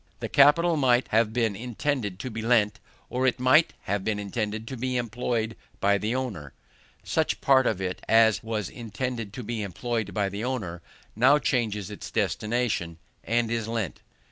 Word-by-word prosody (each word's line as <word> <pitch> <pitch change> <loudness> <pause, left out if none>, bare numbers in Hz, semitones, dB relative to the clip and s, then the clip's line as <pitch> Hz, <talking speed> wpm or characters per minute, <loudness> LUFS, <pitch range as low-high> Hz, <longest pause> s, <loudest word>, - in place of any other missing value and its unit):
The - - -4
capital 160 +4 +5
might 125 -3 +3
have 110 0 +3
been 115 -3 0
intended 120 -2 -2
to 130 - -5
be 110 +1 -4
lent, 110 -3 +2 0.3
or 130 +1 0
it 125 - +1
might 130 +6 +5
have 100 0 -2
been 105 0 -1
intended 105 +2 -3
to 130 - -5
be 130 +1 -2
employed 115 -1 -2 0.2
by 100 0 +3
the 110 +5 -1
owner: 100 - -4 0.5
such - - 0
part 130 -2 +4
of - - 0
it 95 -1 -4
as 110 -1 +5
was 110 -4 -3
intended 115 -1 -5
to 125 - -6
be 115 0 -3
employed 105 +2 -3
by 100 -1 0
the 100 +3 -5
owner 100 -10 -3 0.3
now 130 +7 +5
changes 110 -8 -1
its 105 - -7
destination, 105 -7 -1 0.3
and 115 0 0
is 115 -2 -1
lent. 115 -6 -3
115 Hz, 170 wpm, -26 LUFS, 105-125 Hz, 0.5 s, capital